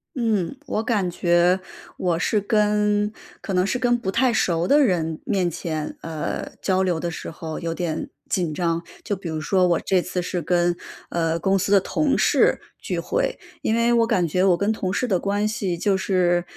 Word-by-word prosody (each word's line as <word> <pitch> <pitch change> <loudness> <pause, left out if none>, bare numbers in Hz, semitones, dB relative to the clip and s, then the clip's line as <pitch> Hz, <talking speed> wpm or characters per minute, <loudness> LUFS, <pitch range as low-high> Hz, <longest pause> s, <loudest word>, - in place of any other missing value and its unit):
嗯， 225 -3 0
我 220 -5 -2
感 205 -6 0
觉 175 +1 +3 0.4
我 175 -2 0
是 210 +3 +1
跟 210 -1 +2 0.3
可 195 - -5
能 180 +1 +3
是 250 - -1
跟 245 -1 +2
不 230 -5 -3
太 245 +3 +2
熟 175 -5 +1
的 290 - +5
人 165 - 0
面 185 -3 +1
前， 155 -2 -4
呃， 160 -2 -4
交 190 -1 +2
流 180 -3 0
的 170 +1 -2
时 165 - -6
候 160 0 -6
有 165 -1 -2
点 165 -2 -3 0.2
紧 175 -5 -1
张， 170 0 -1 0.2
就 205 - -1
比 185 -3 -7
如 160 -1 -3
说 180 +4 +2
我 170 - +2
这 185 -2 +1
次 180 0 -3
是 175 0 -3
跟， 175 +1 +1 0.3
呃， 165 -1 0
公 195 +3 +2
司 195 +1 -1
的 200 - +7
同 285 +9 0
事 - - +3 0.2
聚 - - -3
会。 - - -1 0.2
因 - - 0
为 235 +1 +3
我 230 -1 +4
感 185 -7 +2
觉 180 +4 +1
我 185 -3 +4
跟 200 +4 +1
同 190 -4 -2
事 250 - 0
的 195 -5 +2
关 205 +3 0
系 210 -6 -2
就 195 +3 +1
是， 180 -2 +1
185 Hz, 215 characters per minute, -23 LUFS, 170-210 Hz, 0.4 s, 的